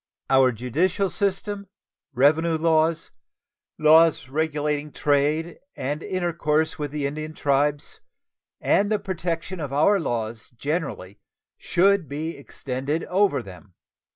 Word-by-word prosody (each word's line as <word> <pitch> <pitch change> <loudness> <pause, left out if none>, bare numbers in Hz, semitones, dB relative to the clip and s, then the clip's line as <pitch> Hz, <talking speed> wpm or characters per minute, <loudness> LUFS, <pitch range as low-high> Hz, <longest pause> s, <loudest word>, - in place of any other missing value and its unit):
Our 130 -1 +5
judicial 165 - 0
system, 200 0 -2 0.4
revenue 155 +5 +3
laws, 160 0 +1 0.7
laws 155 -2 +5
regulating 150 0 -1
trade 150 +4 0 0.2
and 145 +4 -3
intercourse 165 -2 -1
with 145 -1 -2
the 145 0 -3
Indian 155 +2 -4
tribes, 145 0 0 0.6
and 205 +1 +2
the 215 - +3
protection 180 -2 -4
of 145 -4 -4
our 160 +9 +3
laws 115 -6 -3
generally 140 - -4 0.4
should 195 -2 +2
be 155 +4 -4
extended 140 +2 -4
over 195 +2 +1
them. 95 -1 -13
155 Hz, 110 wpm, -24 LUFS, 140-170 Hz, 0.7 s, Our